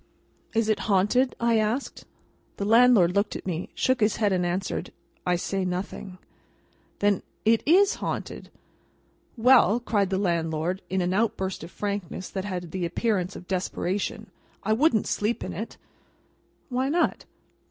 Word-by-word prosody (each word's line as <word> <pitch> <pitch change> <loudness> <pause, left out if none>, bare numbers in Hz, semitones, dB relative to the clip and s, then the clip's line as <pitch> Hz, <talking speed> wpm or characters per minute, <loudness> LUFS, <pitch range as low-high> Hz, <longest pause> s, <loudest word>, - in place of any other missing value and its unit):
"Is 225 -1 +2
it 215 - +1
haunted?" 210 +7 +3
I 235 -1 +3
asked. 220 +5 -2 0.5
The 200 - -2
landlord 225 -5 +5
looked 200 +1 0
at - - -7
me, 175 -2 -3
shook 260 -1 +1
his 210 -1 +2
head, 205 -3 +1
and 180 -1 +1
answered, 180 +2 -2 0.4
"I 180 - +3
say 190 +2 -2
nothing." 185 +1 -4 0.8
"Then 205 -2 +2 0.2
it 225 +1 +4
is 390 +6 +5
haunted?" - - -4 0.9
"Well!" 235 -2 +5
cried 205 -5 0
the 190 - 0
landlord, 170 -1 -1
in 190 0 0
an 180 +1 0
outburst 190 -3 -1
of - - -8
frankness 200 -2 -4
that 190 -1 -3
had 180 -4 -5
the 185 0 -3
appearance 185 +1 -1
of 180 - -10
desperation—"I 190 +3 -3
wouldn't 235 -2 +3
sleep 215 +3 -1
in - - -5
it." - - -6 0.9
"Why 260 +1 0
not?" 340 +4 0
200 Hz, 145 wpm, -26 LUFS, 185-225 Hz, 0.9 s, landlord